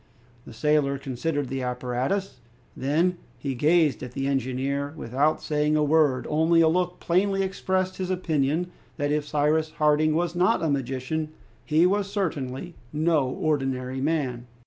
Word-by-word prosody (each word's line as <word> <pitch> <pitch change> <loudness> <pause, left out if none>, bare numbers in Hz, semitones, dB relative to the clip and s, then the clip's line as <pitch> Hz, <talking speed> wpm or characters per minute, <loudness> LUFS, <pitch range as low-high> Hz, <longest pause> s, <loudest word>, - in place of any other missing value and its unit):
The - - -11
sailor 140 +3 +1
considered 140 +2 -2
the 135 +1 -3
apparatus; 125 +8 -2 0.4
then 165 +7 +1 0.2
he 135 +2 -3
gazed 150 +3 +3
at 125 -1 -7
the 135 - -2
engineer 140 +2 -1
without 145 +5 0
saying 150 0 +1
a 155 - +3
word, 145 -4 +3
only 160 +2 +3
a 165 - +5
look 180 +2 0
plainly 195 +3 +1
expressed 185 -1 -1
his 185 -1 -3
opinion 165 -1 0 0.3
that 145 -1 0
if 150 0 0
Cyrus 150 +2 +1
Harding 155 0 +3
was 170 0 0
not 180 -1 +2
a 160 - +1
magician, 135 +3 -2 0.3
he 155 +7 +3
was 200 +1 +1
certainly 165 -4 -3 0.2
no 155 -2 +2
ordinary 130 -3 -1
man. 135 -5 -1
150 Hz, 145 wpm, -25 LUFS, 135-170 Hz, 0.4 s, a